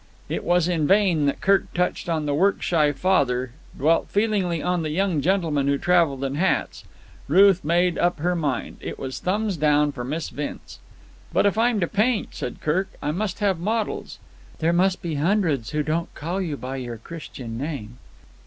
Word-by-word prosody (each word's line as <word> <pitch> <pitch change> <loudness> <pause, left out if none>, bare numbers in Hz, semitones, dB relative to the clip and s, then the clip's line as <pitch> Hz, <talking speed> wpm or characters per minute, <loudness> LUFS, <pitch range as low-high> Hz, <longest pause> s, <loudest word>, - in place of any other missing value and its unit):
It - - -2
was 175 -1 +2
in 165 -4 +1
vain 185 -7 +3
that 140 - -1
Kirk 195 0 +2
touched 180 -1 -1
on 160 -2 0
the 145 - 0
work 190 +7 +2
shy 155 -4 +3
father, 135 -7 +1 0.3
dwelt 160 +4 +2
feelingly 200 -5 +1
on 180 +1 0
the 155 - -2
young 175 -1 0
gentleman 160 -5 +1
who 140 0 +2
travelled 165 -5 +2
in 135 0 -2
hats. 170 +7 0 0.4
Ruth 190 +5 +6
had 185 - -19
made 175 +2 +2
up 175 -1 +2
her 175 +4 0
mind. 145 -7 -2
It - - -6
was 130 -1 -5
thumbs 205 0 -1
down 150 -1 +3
for 125 -3 -6
Miss 155 +6 -3
Vince. 145 0 -7 0.5
"But - - +2
if 200 - +3
I'm 230 0 +2
to 170 - +1
paint," 215 +4 +1
said 125 - -6
Kirk, 185 +6 0
"I 150 - 0
must 190 +4 -3
have 195 -4 +1
models." 215 +4 -2 0.4
"There 165 +1 +1
must 185 +2 +2
be 170 -2 -2
hundreds 150 - +1
who 150 0 -1
don't 160 +3 -2
call 175 +5 -3
you 160 -6 -3
by 130 +1 -5
your 120 -3 -5
Christian 120 -4 -8
name." 125 -6 -5
165 Hz, 190 wpm, -24 LUFS, 145-190 Hz, 0.5 s, Ruth